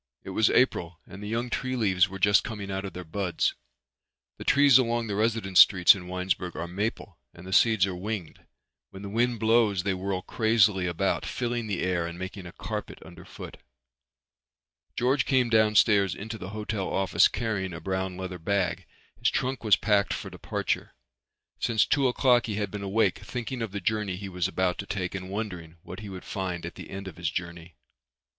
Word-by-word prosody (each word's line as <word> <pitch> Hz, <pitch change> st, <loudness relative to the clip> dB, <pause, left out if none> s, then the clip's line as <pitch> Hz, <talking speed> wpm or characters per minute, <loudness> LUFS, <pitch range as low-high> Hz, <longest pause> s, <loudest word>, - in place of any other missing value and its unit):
It 95 Hz, -, -7 dB
was 110 Hz, +3 st, +3 dB
April 85 Hz, -9 st, +1 dB
and 95 Hz, +2 st, -11 dB
the 105 Hz, -, -6 dB
young 120 Hz, +2 st, -2 dB
tree 130 Hz, 0 st, -2 dB
leaves 95 Hz, -5 st, +2 dB
were 95 Hz, -, -7 dB
just 100 Hz, +1 st, +4 dB
coming 105 Hz, -4 st, -6 dB
out 95 Hz, +1 st, -3 dB
of 95 Hz, -, -6 dB
their 90 Hz, -, -7 dB
buds. 90 Hz, 0 st, -1 dB, 0.8 s
The -, -, -7 dB
trees 140 Hz, -2 st, +6 dB
along 120 Hz, -2 st, 0 dB
the 105 Hz, -, -3 dB
residence 110 Hz, -3 st, +1 dB
streets 90 Hz, -3 st, +8 dB
in 90 Hz, -3 st, -8 dB
Winesburg 90 Hz, -1 st, -2 dB
are 85 Hz, -, -4 dB
maple 100 Hz, +6 st, -4 dB, 0.2 s
and 85 Hz, -, -12 dB
the 95 Hz, -, -5 dB
seeds 110 Hz, -3 st, +5 dB
are 95 Hz, -, -4 dB
winged. 95 Hz, -2 st, -5 dB, 0.5 s
When 95 Hz, +1 st, -11 dB
the 100 Hz, -, -6 dB
wind 120 Hz, +2 st, 0 dB
blows 110 Hz, -4 st, +3 dB
they 95 Hz, -, 0 dB
whirl 95 Hz, 0 st, -3 dB
crazily 110 Hz, -5 st, +2 dB
about, 90 Hz, +3 st, 0 dB
filling 120 Hz, -2 st, -3 dB
the 100 Hz, -4 st, -2 dB
air 90 Hz, -2 st, 0 dB
and 85 Hz, 0 st, -7 dB
making 95 Hz, 0 st, -7 dB
a -, -, -9 dB
carpet -, -, -6 dB
underfoot. -, -, -11 dB, 1.4 s
George 130 Hz, +3 st, +2 dB
came 130 Hz, -3 st, +3 dB
downstairs 105 Hz, -3 st, +4 dB
into 110 Hz, +2 st, -7 dB
the 90 Hz, -, -7 dB
hotel 105 Hz, -2 st, -3 dB
office 95 Hz, -2 st, +4 dB
carrying 105 Hz, -4 st, -2 dB
a 85 Hz, -, -7 dB
brown 95 Hz, +1 st, -3 dB
leather 95 Hz, -1 st, -6 dB
bag. 95 Hz, +1 st, -1 dB, 0.3 s
His -, -, +3 dB
trunk 130 Hz, 0 st, -2 dB
was 105 Hz, -4 st, +6 dB
packed 105 Hz, -2 st, +1 dB
for -, -, -7 dB
departure. -, -, -3 dB, 0.6 s
Since 110 Hz, -3 st, +2 dB
two 140 Hz, -2 st, +2 dB
o'clock 125 Hz, -1 st, +3 dB
he 105 Hz, -, -2 dB
had 105 Hz, -2 st, -2 dB
been 105 Hz, -, -5 dB
awake 100 Hz, +3 st, +1 dB
thinking 125 Hz, 0 st, -5 dB
of 115 Hz, -4 st, -3 dB
the 100 Hz, -, -4 dB
journey 105 Hz, 0 st, -1 dB
he 100 Hz, +1 st, -7 dB
was 90 Hz, -2 st, -1 dB
about 95 Hz, -1 st, -1 dB
to 100 Hz, -, -5 dB
take 95 Hz, -3 st, -3 dB
and 95 Hz, -1 st, -6 dB
wondering 90 Hz, -6 st, -5 dB
what 90 Hz, -, -8 dB
he 105 Hz, -1 st, -8 dB
would 95 Hz, -1 st, -9 dB
find 90 Hz, -3 st, -4 dB
at 85 Hz, -, -6 dB
the -, -, -10 dB
end 95 Hz, 0 st, -7 dB
of 90 Hz, -, -9 dB
his 85 Hz, 0 st, -1 dB
journey. 85 Hz, -1 st, -6 dB
100 Hz, 195 wpm, -27 LUFS, 90-110 Hz, 1.4 s, streets